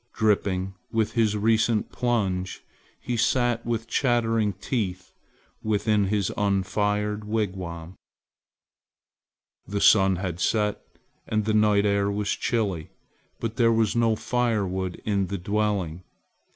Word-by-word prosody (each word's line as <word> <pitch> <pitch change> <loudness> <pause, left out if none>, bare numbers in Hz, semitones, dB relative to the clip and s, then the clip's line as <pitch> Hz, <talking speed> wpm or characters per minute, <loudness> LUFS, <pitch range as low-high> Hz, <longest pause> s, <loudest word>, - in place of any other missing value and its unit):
Dripping 95 -3 +1 0.2
with 110 -1 +1
his 110 -3 +1
recent 110 +1 +2
plunge 95 -7 -1 0.4
he 125 - -3
sat 120 0 +1
with 115 -1 -2
chattering 115 -4 +1
teeth 95 -2 -3 0.5
within 105 -1 +1
his 100 -1 0
unfired 105 +1 0
wigwam. 95 -6 -3 1.7
The 100 0 -2
sun 95 -2 +5
had 90 -2 -4
set 105 +3 0 0.5
and 110 -1 0
the 110 - +1
night 105 -1 +4
air 100 0 +2
was 100 0 -1
chilly, 100 -9 -1 0.5
but 115 -1 -4
there 115 -1 +4
was 110 -1 +2
no 115 -1 +3
fire 115 -3 0
wood 95 -1 -3
in 100 -3 +1
the 100 +2 -3
dwelling. 95 -3 -1
105 Hz, 120 wpm, -25 LUFS, 95-115 Hz, 1.7 s, sun